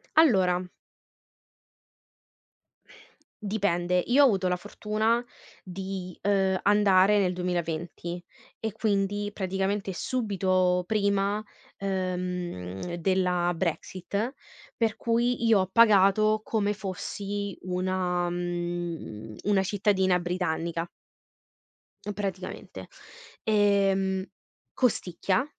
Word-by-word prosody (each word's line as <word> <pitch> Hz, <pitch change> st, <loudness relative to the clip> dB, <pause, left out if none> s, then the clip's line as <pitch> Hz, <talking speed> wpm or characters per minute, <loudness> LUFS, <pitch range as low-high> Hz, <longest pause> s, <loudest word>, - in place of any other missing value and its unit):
Allora 185 Hz, -, +4 dB, 2.8 s
Dipende. 180 Hz, -4 st, +1 dB
Io 275 Hz, +4 st, +6 dB
ho -, -, +8 dB
avuto 195 Hz, -6 st, +2 dB
la 180 Hz, -, +1 dB
fortuna 215 Hz, +4 st, -1 dB, 0.4 s
di, 185 Hz, -1 st, -6 dB
ehm, 195 Hz, -2 st, +2 dB
andare 205 Hz, 0 st, +5 dB
nel 180 Hz, -2 st, +1 dB
2020, 175 Hz, 0 st, -3 dB, 0.4 s
e 220 Hz, -1 st, -2 dB
quindi, 205 Hz, -1 st, 0 dB
praticamente, 195 Hz, 0 st, -2 dB
subito 185 Hz, -5 st, +1 dB
prima, 200 Hz, 0 st, +1 dB, 0.3 s
ehm, 180 Hz, -, -3 dB
della 180 Hz, 0 st, +1 dB
Brexit, 185 Hz, -, -2 dB, 0.4 s
per 225 Hz, -2 st, 0 dB
cui, 235 Hz, +1 st, 0 dB
io 220 Hz, -3 st, +5 dB
ho 185 Hz, -, +1 dB
pagato 215 Hz, -1 st, +5 dB
come 210 Hz, -2 st, 0 dB
fossi 200 Hz, 0 st, -4 dB
una 180 Hz, -1 st, -1 dB
mhmm, 175 Hz, -10 st, -4 dB
una 200 Hz, -1 st, +3 dB
cittadina 190 Hz, -2 st, +2 dB
britannica. 170 Hz, -1 st, -2 dB, 1.3 s
Praticamente. 190 Hz, -2 st, -5 dB, 0.6 s
Ehm, 195 Hz, -2 st, +2 dB, 0.5 s
costicchia, 200 Hz, -, +1 dB
190 Hz, 80 wpm, -27 LUFS, 180-205 Hz, 2.8 s, ho